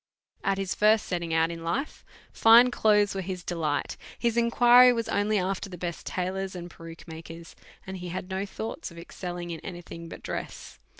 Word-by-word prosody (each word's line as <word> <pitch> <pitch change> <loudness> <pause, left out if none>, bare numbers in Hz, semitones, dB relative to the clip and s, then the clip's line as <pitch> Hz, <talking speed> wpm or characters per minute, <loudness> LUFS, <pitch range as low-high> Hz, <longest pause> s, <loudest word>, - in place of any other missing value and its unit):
At 195 -1 +1
his 195 -2 -2
first 215 +1 +3
setting 170 -2 -3
out 165 +1 +2
in 165 -1 -7
life, 175 - -3 0.3
fine 235 +2 +7
clothes 210 -3 +3
were 195 - -3
his 185 -1 -5
delight, 155 -5 -2 0.2
his 235 -1 0
inquiry 240 +1 +6
was 230 -2 -1
only 205 +1 +1
after 195 +1 -2
the 180 - -8
best 170 -1 -5
tailors 190 +1 -3
and 175 -1 -7
peruke 165 0 -11
makers, 165 +1 -10 0.3
and 190 0 -6
he 180 -1 -6
had 180 +1 -5
no 190 +1 -1
thoughts 220 +2 -6
of 170 - -14
excelling 175 0 -6
in 165 - -5
any 175 +1 -8
thing 170 0 -9
but - - -10
dress. - - -6
185 Hz, 190 wpm, -27 LUFS, 170-210 Hz, 0.3 s, fine